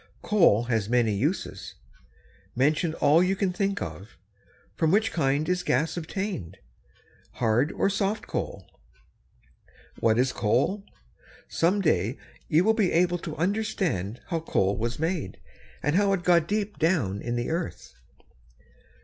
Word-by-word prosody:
Coal 170 - +4
has 110 -4 -1
many 120 -3 +2
uses. 145 - -3 0.8
Mention 155 +5 +1
all 150 +3 +4
you 185 +2 +2
can 190 -2 -1
think 195 +1 -1
of. 85 +4 -9 0.6
From 160 - +1
which 215 +5 +2
kind 145 -1 0
is 180 0 0
gas 155 0 0
obtained, 170 - -4 0.8
hard 120 +5 +1
or - - +1
soft 200 +2 -1
coal? - - -4 1.3
What 110 0 +3
is 130 +1 +2
coal? 135 - 0 0.6
Some 185 +5 +1
day 120 - +1 0.3
you 160 +3 +3
will 220 +3 +4
be 215 -5 +1
able 175 +1 +2
to 160 -2 -6
understand 175 - -1
how 165 -3 0
coal 100 -11 0
was 115 +2 -3
made, 160 0 -3 0.4
and 150 +2 +1
how 200 0 +3
it 185 -3 -1
got 170 -2 +3
deep 210 +1 -2
down 155 - +1
in 120 0 -3
the 120 +5 -2
earth. 170 +1 -4
160 Hz, 140 wpm, -26 LUFS, 120-190 Hz, 1.3 s, Coal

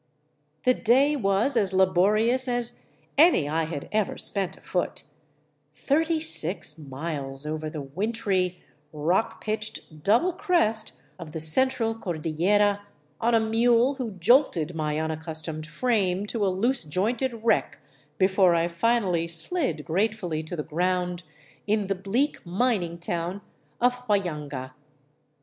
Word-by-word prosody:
The 255 - +4
day 265 +6 +3
was 220 +2 +2
as 195 -4 +3
laborious 215 +7 +3
as 240 -1 0 0.4
any 315 - +5
I 160 +2 0
had 155 -3 -6
ever 215 -2 0
spent 190 -2 0
afoot, 180 - -3 0.4
— 150 -1 -44
thirty 320 +3 +1
six 180 - +2
miles 140 -1 -6
over 155 0 -4
the 150 -2 -6
wintry, 185 +3 -2 0.3
rock 165 +8 -1
pitched 215 -7 -5
double 245 - +3
crest 335 - 0 0.3
of 160 -3 -9
the 160 - -4
Central 225 +8 +2
Cordillera 200 +2 0 0.4
on 235 +1 +2
a - - +5
mule 235 +3 +3
who 250 -6 -5
jolted 180 - +2
my 155 -2 -2
unac 160 0 -3
customed 155 -1 -4
frame 195 +1 0
to 210 0 -2
a - - +2
loose 230 +7 0
jointed 225 - -2
wreck 230 - +1 0.4
before 190 -2 +4
I 165 0 +1
finally 180 -2 +1
slid 165 - +1
grate 200 +6 0
fully 170 -7 -4
to 160 +2 -7
the 150 - -3
ground 180 +2 -1 0.5
in 210 0 +1
the 195 - 0
bleak 200 +10 -1
mining 180 -2 -1
town 175 +3 -4 0.4
of 250 +1 +2
Huallanga. 150 -10 -2
190 Hz, 135 wpm, -26 LUFS, 160-230 Hz, 0.5 s, any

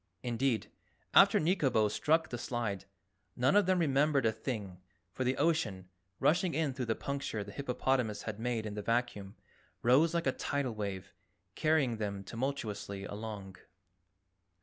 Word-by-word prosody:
Indeed, 120 -1 0 0.4
after - - +7
Nikobo 145 - +2
struck 160 +9 +1
the 120 - -4
slide, 115 -6 -3 0.5
none 130 +8 +3
of 205 -2 +5
them 185 0 +3
remembered 145 -4 +2
a 110 - +4
thing, 105 -5 -5 0.3
for 130 - -3
the 130 +1 0
ocean, 110 - 0 0.3
rushing 175 +2 +2
in 155 -4 0
through 130 -1 -3
the 110 - +1
puncture 140 -6 -3
the 100 - -9
hippopotamus 125 -4 -1
had 110 -1 -5
made 115 -1 -1
in 105 - -4
the 105 - -4
vacuum, 115 -3 -1 0.5
rose 150 +8 +4
like 170 - 0
a 130 - +3
tidal 135 -2 -2
wave, 100 -3 -5 0.4
carrying 145 -6 +2
them 100 -2 -3
tumultuously 105 -4 -4
along. 100 -2 -7
120 Hz, 150 wpm, -32 LUFS, 105-140 Hz, 0.5 s, after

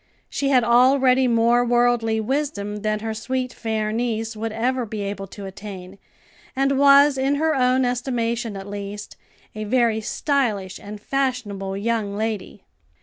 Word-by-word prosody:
She 275 - -1
had 255 -3 +4
already 255 +2 +4
more 235 +1 +3
worldly 240 -2 +2
wisdom 220 -4 -2
than 215 0 -2
her 220 0 -3
sweet, 255 +3 -3
fair 220 -2 -2
niece 225 -1 -2
would 220 +1 -4
ever 250 +3 -1
be 215 -2 -5
able 200 0 -4
to 200 +1 -9
attain, 190 -1 -9 0.6
and 275 0 +1
was, 280 0 +6
in 270 +2 +1
her 315 +2 +1
own 255 -1 +2
estimation 235 -3 -2
at 195 - -7
least, 205 0 -7 0.4
a 215 - -5
very 230 0 +1
stylish 215 -7 -1
and 205 +1 -9
fashionable 210 -7 -2
young 210 -1 -1
lady. 215 -3 -4
230 Hz, 145 wpm, -22 LUFS, 210-255 Hz, 0.6 s, was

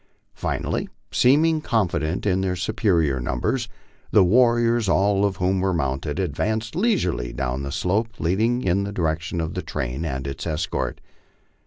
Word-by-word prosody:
Finally, - - -2 0.2
seeming 155 +5 +4
confident 90 - 0
in 95 -2 +2
their 95 -1 0
superior 85 - +1
numbers, 115 - -1 0.4
the 105 - +5
warriors, 120 +1 +3
all 100 +1 +3
of 100 -1 +1
whom 95 +1 +1
were 95 -1 +1
mounted, 70 0 -2
advanced 110 - -2
leisurely 180 - 0
down 65 +2 -2
the 70 0 -4
slope 100 +9 0
leading 110 +8 +1
in 95 +2 +1
the 100 - -4
direction 85 -2 -2
of 80 -1 -2
the - - -3
train 65 +5 -4
and 65 -5 -3
its 70 +4 -5
escort. 80 0 -2
95 Hz, 150 wpm, -23 LUFS, 80-110 Hz, 0.4 s, the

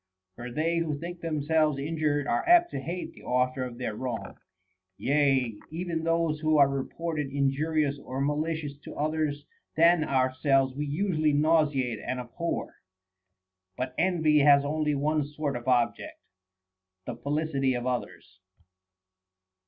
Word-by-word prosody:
For 120 +1 -7
they 165 +5 0
who 155 -3 -2
think 170 +3 -7
themselves 155 -1 +1
injured 145 0 -1
are 120 - 0
apt 345 0 +6
to - - -3
hate 170 +7 -5
the - - -15
author 125 +1 0
of 125 -2 -6
their 125 -3 -3
wrong; 125 -1 -5 0.6
yea, 135 -6 +1
even 165 0 -3
those 165 -2 +1
who 155 0 +2
are 140 -1 +7
reputed 150 +2 -3
injurious 140 +1 0
or 130 0 -6
malicious 150 +1 -1
to - - -10
others 150 -1 -1 0.3
than 170 0 +5
ourselves 130 0 +2
we 145 +2 -3
usually 155 -1 +1
nauseate 145 -6 +2
and 130 - -3
abhor. 125 +8 -4 1.0
But 130 0 -3
envy 160 -4 +3
has 140 0 +6
only 150 0 0
one 150 +2 +1
sort 145 -1 -3
of 120 +1 -6
object, 125 -2 0 0.9
the - - -5
felicity 140 -3 -1
of 120 0 -3
others. 120 -7 -4
145 Hz, 135 wpm, -28 LUFS, 135-160 Hz, 1.0 s, are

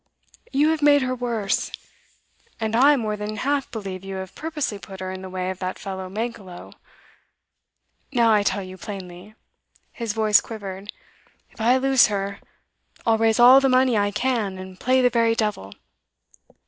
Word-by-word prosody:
'You 290 +3 +3
have 320 -1 0
made 290 -1 +5
her 255 0 -1
worse. 235 -5 -2 0.9
And 220 0 -1
I 280 +5 +6
more 215 -5 -2
than 210 +1 -5
half 280 +4 -1
believe 195 -4 -6
you 195 0 -6
have 190 -1 -7
purposely 300 -10 -4
put 190 -1 -11
her 185 0 -4
in 185 0 -7
the 190 - -8
way 185 0 -3
of 190 - -9
that 185 0 -4
fellow 190 -2 -6
Mankelow. 205 -4 -6 1.4
Now 235 -4 +4
I 210 - +4
tell 200 0 -1
you 185 0 -10
plainly' 190 0 -9 0.6
his 230 -3 -4
voice 215 -2 +4
quivered 200 -2 -8 0.6
'if - - -11
I 245 +3 +4
lose 265 -1 +4
her, 200 -1 -3 0.7
I'll 225 -2 +3
raise 225 0 +2
all 250 +3 +9
the 270 0 +2
money 255 -1 +3
I 205 -1 +2
can 210 -3 -1
and 185 0 -10
play 255 +1 +2
the 245 - +4
very 230 -1 +2
devil. 210 - -2
215 Hz, 170 wpm, -23 LUFS, 195-250 Hz, 1.4 s, all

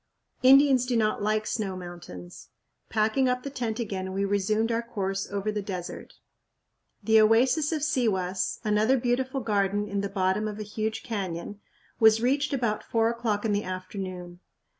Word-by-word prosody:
Indians 265 -1 +6
do 245 -2 +1
not 215 -2 +1
like 215 +1 0
snow 195 -5 -2
mountains. 170 - -10 0.4
Packing 220 +4 +2
up 250 0 -1
the 280 - -5
tent 235 -3 -3
again, 190 -4 -3
we 195 +1 0
resumed 215 +3 +1
our 230 0 +1
course 195 -5 -3
over 200 +1 -1
the 210 0 -2
desert. 185 -3 -7 0.9
The 220 0 +5
oasis 250 +8 +3
of 310 -3 -1
Sihuas, 195 -11 0
another 215 +4 +3
beautiful 255 +2 -1
garden 205 -2 0
in 200 -1 -2
the 200 - -3
bottom 190 +2 0
of 210 -1 -5
a 215 - -4
huge 215 +1 -3
canyon, 195 -3 -4 0.4
was 220 0 +6
reached 275 +5 +1
about 235 -6 -1
four 225 0 +1
o'clock 230 -3 -2
in 220 - +1
the 205 +1 0
afternoon. 185 -1 -6
215 Hz, 160 wpm, -27 LUFS, 195-235 Hz, 0.9 s, Indians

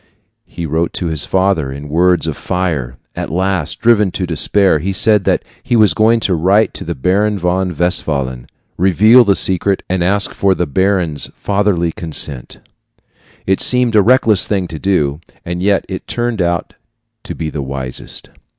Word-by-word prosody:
He 85 0 -6
wrote 80 +2 -1
to 90 - -4
his 80 -3 +1
father 95 -7 0
in 70 +2 -8
words 85 +3 +2
of 80 -3 -2
fire. 80 -10 -3 0.2
At - - -4
last, 85 -3 -1
driven 110 -4 +3
to 95 - -2
despair, 90 +1 +2
he 95 +5 -3
said 105 0 +3
that - - +1 0.2
he 120 - -1
was 110 -3 +4
going 115 +1 +3
to 95 - 0
write 95 +6 +2
to - - -7
the - - -4
Baron 100 +8 +1
von 90 -1 -1
Westphalen, 70 -8 -2 0.3
reveal 105 +7 +5
the 100 -3 +2
secret, 95 +1 +1
and 90 -1 -1
ask 100 +3 +1
for 95 -1 +1
the 90 - -1
baron's 85 -1 0
fatherly 100 -4 0
consent. 75 -6 -4 0.9
It 95 0 0
seemed 125 -2 +3
a 105 - +6
reckless 115 -2 +3
thing 95 -4 -1
to 80 0 -7
do, 75 -7 0 0.3
and 85 0 -4
yet 100 +1 +1
it 95 - -7
turned 120 -4 -2
out 85 0 -1 0.5
to - - -6
be 80 -2 -4
the 75 - -4
wisest. 65 -2 -6
90 Hz, 170 wpm, -15 LUFS, 80-100 Hz, 0.9 s, a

